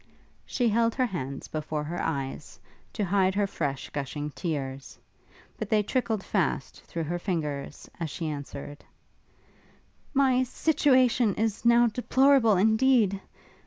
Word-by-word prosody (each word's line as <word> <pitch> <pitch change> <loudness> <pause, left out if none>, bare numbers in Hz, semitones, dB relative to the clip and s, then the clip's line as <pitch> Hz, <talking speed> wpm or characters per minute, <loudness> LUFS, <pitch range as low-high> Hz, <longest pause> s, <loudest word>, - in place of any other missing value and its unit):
She 245 -2 0
held 230 +1 +2
her 255 - +2
hands 140 - -5
before 155 -1 -3
her 165 +4 -4
eyes, 135 -7 -4 0.3
to 205 - -1
hide 190 0 +2
her 205 0 +2
fresh 145 -8 -4
gushing 145 +1 -4
tears, 135 -2 -5 0.6
but - - -4
they 215 -1 +3
trickled 225 -3 -1
fast 170 -8 -1
through 165 - -4
her 175 +3 -3
fingers, 150 -7 -4
as 165 -2 -3
she 165 - -5
answered, 145 -1 -7 1.3
'My 265 -2 +4
situation 255 -5 +2
is 220 0 -2
now 235 0 +6
deplorable 250 -1 +3
indeed! 220 -1 +3
195 Hz, 125 wpm, -27 LUFS, 150-235 Hz, 1.3 s, now